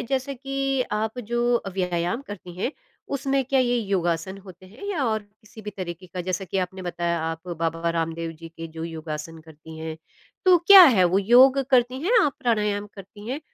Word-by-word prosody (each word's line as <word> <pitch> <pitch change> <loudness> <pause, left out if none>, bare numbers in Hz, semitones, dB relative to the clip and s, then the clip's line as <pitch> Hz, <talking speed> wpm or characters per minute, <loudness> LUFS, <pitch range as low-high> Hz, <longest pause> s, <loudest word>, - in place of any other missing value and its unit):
जैसा 270 +1 -2
कि 275 0 -1
आप 220 +3 -2
जो 240 +1 0
अ, 195 - -5
व्यायाम 180 +5 -2
करती 180 -4 -9
हैं, 245 +9 -1 0.4
उसमें 275 0 0
क्या 270 +1 +2
ये 245 -1 +2
योगासन 190 -2 -1
होते 185 0 -13
हैं 220 - -12
या 310 -9 -1
और 220 -1 +1
किसी 210 +1 -17
भी 210 - -5
तरीके 180 0 -6
का? 180 +1 -6
जैसा 185 +2 -3
कि 190 - -3
आपने 185 0 -3
बताया, 170 -1 -2
आप 165 +2 -5
बाबा 165 +1 -1
रामदेव 165 0 -3
जी 165 - -9
के 165 0 -8
जो 160 0 -7
योगासन 160 0 -6
करती 160 0 -13
हैं, 160 0 -5 0.5
तो 365 -1 +7
क्या 390 -2 +11
है 215 - +5
वो, 180 +3 +3
योग 250 +6 +6
करती 255 0 +3
हैं 455 +6 +4
आप, 285 - +1
प्राणायाम 210 -3 0
करती 205 +2 -11
हैं? 275 +4 -3
195 Hz, 195 wpm, -24 LUFS, 170-245 Hz, 0.5 s, क्या